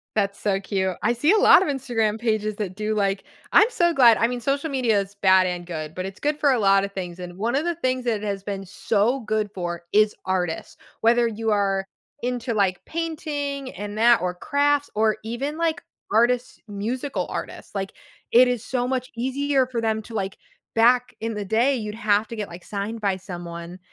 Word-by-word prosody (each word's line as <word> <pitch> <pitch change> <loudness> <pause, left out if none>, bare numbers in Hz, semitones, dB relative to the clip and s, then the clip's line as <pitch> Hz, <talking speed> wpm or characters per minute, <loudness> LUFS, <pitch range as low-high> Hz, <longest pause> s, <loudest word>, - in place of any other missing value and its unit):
That's 200 -1 0
so 195 -2 0
cute. 190 -2 -2
I 235 - +3
see 295 +9 +2
a 435 - +5
lot 410 - +7
of 375 - 0
Instagram 225 -5 -1
pages 215 -2 0
that 195 -4 -4
do, 215 +1 -2
like 195 -1 0 0.3
I'm 425 - +7
so 345 -8 +2
glad 240 -5 +6
I 230 - +3
mean, 245 0 -4
social 280 +5 -1
media 245 -7 +2
is 200 0 -5
bad 190 -1 +5
and 175 -1 -4
good, 155 -3 -6
but, 185 - -3
it's 195 +1 -8
good 295 0 0
for 285 -2 +4
a 250 - +2
lot 195 -1 +4
of 200 - -4
things, 180 -2 -6
and 180 0 -8
one 230 +5 -1
of 285 - +1
the 345 0 -1
things 255 -5 -1
that 230 -3 +1
it - - -9
has 200 -1 -3
been 195 -1 -5
so 220 +7 0
good 215 -1 -1
for 175 -2 -4
is 215 0 +4
artists, 180 -3 -2 0.3
whether 235 +1 +4
you 225 0 -2
are 195 -2 +1 0.4
into, 245 -1 -2
like, 195 -4 +1
painting 290 -4 -3
and 205 +2 -6
that 235 +1 +5
or 180 0 -1
crafts 285 +7 +1
or 215 0 +2
even, 270 +7 -3
like, 335 0 0 0.3
artists 240 +3 +2
musical 230 +7 -3
artists, - - -6
like, 195 -1 -3 0.4
it 250 +2 +7
is 245 -2 -1
so 250 -1 -1
much 255 -1 -2
easier 265 +2 +1
for 245 -2 -3
them 220 -1 0
to, 225 - -12
like, 195 -3 -3 0.4
back 245 +2 +4
in 225 0 -2
the 210 -1 -4
day, 235 +7 +2
you'd 215 -3 -4
have 210 -1 +1
to 230 - -7
get, 210 -2 -4
like, 170 +1 -10
signed 210 +3 -4
by 195 -2 +1
someone 175 -1 -8
220 Hz, 210 wpm, -24 LUFS, 195-255 Hz, 0.4 s, lot